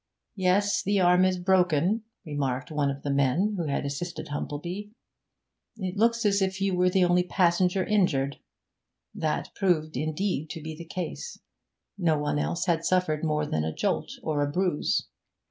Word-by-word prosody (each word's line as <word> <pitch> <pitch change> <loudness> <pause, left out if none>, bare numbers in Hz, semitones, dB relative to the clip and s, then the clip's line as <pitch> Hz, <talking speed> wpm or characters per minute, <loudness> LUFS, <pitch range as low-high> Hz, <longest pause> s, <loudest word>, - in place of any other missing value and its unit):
'Yes, 200 +1 +2
the 200 0 +1
arm 180 0 +5
is 185 0 +2
broken,' 180 +2 +2 0.2
remarked 140 -3 -2
one 145 -2 +1
of 140 0 -5
the 145 - -1
men 140 +10 +2
who 170 -4 -2
had 140 0 -1
assisted 145 +5 -4
Humplebee. 170 +8 -4 0.9
'It 185 -3 -4
looks 230 +2 +2
as 200 -1 +3
if 190 0 0
you 195 -1 +1
were 180 0 +3
the 185 0 +3
only 175 0 +4
passenger 180 +1 +2
injured.' 145 -10 +1 0.7
That 155 -1 -2
proved, 155 -5 0
indeed, 155 +2 -1
to 165 - -6
be 160 0 -5
the 170 +2 -9
case; 180 - -5 0.6
no 165 -4 +2
one 150 0 -1
else 170 +3 -1
had 165 -2 +1
suffered 165 -4 +1
more 150 -1 +1
than 80 - -1
a 80 - -1
jolt - - -1
or 150 -2 0
a 145 0 0
bruise. 180 -1 0
175 Hz, 165 wpm, -27 LUFS, 150-190 Hz, 0.9 s, arm